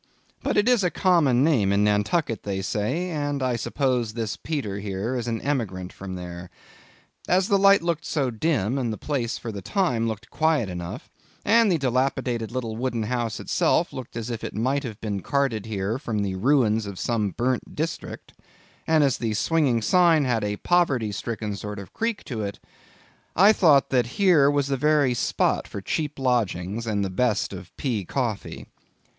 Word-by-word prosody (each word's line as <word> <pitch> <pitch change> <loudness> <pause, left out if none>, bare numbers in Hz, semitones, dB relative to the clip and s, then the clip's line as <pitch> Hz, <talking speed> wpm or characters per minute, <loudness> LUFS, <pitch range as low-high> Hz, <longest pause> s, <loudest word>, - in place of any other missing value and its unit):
But - - -1
it 205 +2 +3
is 245 -5 +4
a 180 - +3
common 150 -8 +3
name 120 -11 +3
in 100 +1 +3
Nantucket, 105 - +1
they 95 -1 -3
say, 130 - -1
and 145 -3 -2
I 125 -2 +1
suppose 120 -1 -1
this 115 -3 -2
Peter 130 -11 -4
here 100 +4 -3
is 120 -1 -3
an 115 -1 -1
emigrant 100 -10 -2
from 95 -1 -7
there. 90 0 -7 0.8
As 185 +1 +2
the 200 - +4
light 200 -2 +6
looked 170 -1 -1
so 135 -5 0
dim, 130 - 0
and 120 -3 -1
the 110 - -4
place, 130 -6 -2
for 115 - -6
the 100 -2 -6
time, 125 - 0
looked 110 0 -5
quiet 155 -9 +1
enough, 90 -1 -7 0.3
and 225 0 +5
the 170 - +3
dilapidated 125 -3 -1
little 120 -3 -3
wooden 120 -1 -2
house 115 0 -2
itself - - +1
looked 125 -2 -7
as 115 +1 -4
if 115 - -5
it - - -5
might 130 +6 0
have 110 -5 -6
been 100 -3 -3
carted 130 -6 -1
here 105 +2 -2
from 110 -7 -2
the 95 -2 -2
ruins 110 0 +2
of 100 -2 -7
some 110 -2 0
burnt 125 +5 -2
district, 160 +3 -5 0.5
and 160 -2 +4
as 135 -3 +1
the 110 -2 -1
swinging 130 -3 +1
sign 165 +1 +4
had 120 -4 0
a 105 0 -2
poverty 140 -11 +1
stricken 105 0 -4
sort 105 +1 -6
of 100 -1 -9
creak 230 -2 -2
to 115 -6 -5
it, 100 -1 -4 0.8
I 200 +5 +7
thought 150 -9 +4
that 125 -3 +2
here 175 -8 +5
was 145 -1 +1
the 140 0 -1
very 145 -2 +3
spot 120 - 0
for - - -6
cheap 150 +8 -3
lodgings, 115 -4 -1
and 100 -2 0
the 95 - -4
best 115 +2 0
of - - -9
pea 115 -7 -1
coffee. 115 +1 -3
120 Hz, 185 wpm, -25 LUFS, 105-145 Hz, 0.8 s, I